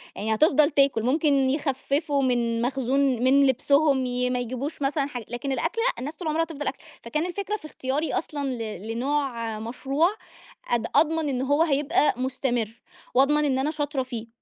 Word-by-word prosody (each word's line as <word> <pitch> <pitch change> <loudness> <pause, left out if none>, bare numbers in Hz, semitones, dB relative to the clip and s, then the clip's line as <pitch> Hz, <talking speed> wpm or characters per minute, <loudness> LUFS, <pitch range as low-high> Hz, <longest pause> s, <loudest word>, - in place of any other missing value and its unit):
يعني 220 +1 -1
هتفضل 305 +3 +4
تاكل، 275 -6 +2
ممكن 275 0 +2
يخففوا 280 +1 0
من 235 -2 +1
مخزون 265 +1 0 0.2
من 275 +1 +5
لبسهم، 275 +1 +3
ي 250 0 -1
ما 250 - 0
يجيبوش 255 +5 -4
مثلًا 280 +1 0
حاجة 245 -5 -7
لكن 240 +3 -4
الأكل 330 - -1
لأ - - 0
الناس 290 +5 -5
طول 340 0 -6
عمرها 315 +2 +1
هتفضل 300 -3 -5
آكله، 270 - -3 0.2
فكان 300 +8 -1
الفكرة 400 +3 -3
في 310 - -15
اختياري 290 +1 -2
أصلًا 290 -3 -2
ل 220 -3 -6
لنوع 235 -3 -2
مشروع 270 +8 0 0.6
أض 235 -2 +1
أضمن 320 -2 +3
إن 255 -1 -1
هو 285 +4 +2
هيبقى 300 +1 +2
مستمر، 245 -3 -2 0.3
وأضمن 295 +3 +4
إن 265 -2 +1
أنا 295 +3 0
شاطرة 290 -3 -2
فيه، 235 -3 -6
275 Hz, 170 wpm, -25 LUFS, 245-300 Hz, 0.6 s, من